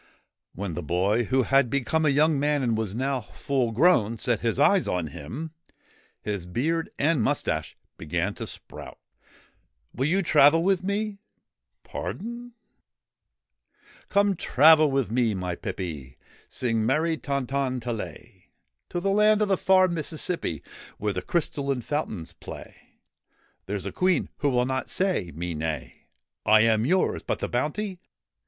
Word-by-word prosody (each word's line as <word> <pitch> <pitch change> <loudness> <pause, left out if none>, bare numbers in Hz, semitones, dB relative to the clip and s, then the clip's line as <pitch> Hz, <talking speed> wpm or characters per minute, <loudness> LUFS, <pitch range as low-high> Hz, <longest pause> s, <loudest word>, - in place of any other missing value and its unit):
When 95 -1 -4
the 90 - -4
boy, 95 +9 +1
who 130 +3 +2
had 135 -1 +3
become 140 +5 +1
a - - +5
young 150 +1 +3
man 145 -1 +1
and 115 -3 +1
was 110 -2 -3
now 130 +1 -1
full 125 +1 -2
grown, 115 - +3
set 115 0 0
his 115 0 -1
eyes 185 +6 +4
on 90 -4 -1
him, 145 - -7 0.7
his 100 -4 -4
beard 160 - -1
and 150 -2 +2
moustache - - -1 0.2
began - - -2
to - - -7
sprout. - - -9 0.5
' - - -43
Will 130 +4 0
you 190 +5 +2
travel 155 0 +5
with 190 -1 +2
me? 200 +1 -2 0.2
' - - -62
' - - -57
Pardon? 235 +3 -6 0.5
' - - -60
' - - -28
Come, 200 0 +3
travel 155 0 +5
with 135 -5 0
me, 115 -3 +1
my 90 -1 -3
pippy. 75 -9 -6 0.3
(Sing 115 -4 0
merry 160 +8 +1
ton 140 -3 -2
ton 130 -1 -1
ta 120 0 -4
lay.} 115 - -8 0.4
To 175 - -2
the 195 +2 0
land 210 +1 +4
of 210 - -1
the 195 - +4
far 185 0 +4
Mississippi 165 - -3 0.3
Where 105 -1 -1
the 90 - -3
crystalline 140 -5 -1
fountains 110 - -4
play; - - -12 0.7
There 100 +2 -2
's 95 - -6
a - - -3
Queen 185 -3 +1
who 145 - +1
will 125 -2 +2
not 130 0 -2
say 185 - 0
me 85 +1 -3
nay.' 75 -5 -5 0.2
' - - -64
I 110 0 +6
am 110 +1 +3
yours! 185 +3 +1
But - - -2
the - - -3
bounty 175 - -2
135 Hz, 165 wpm, -26 LUFS, 110-165 Hz, 0.7 s, I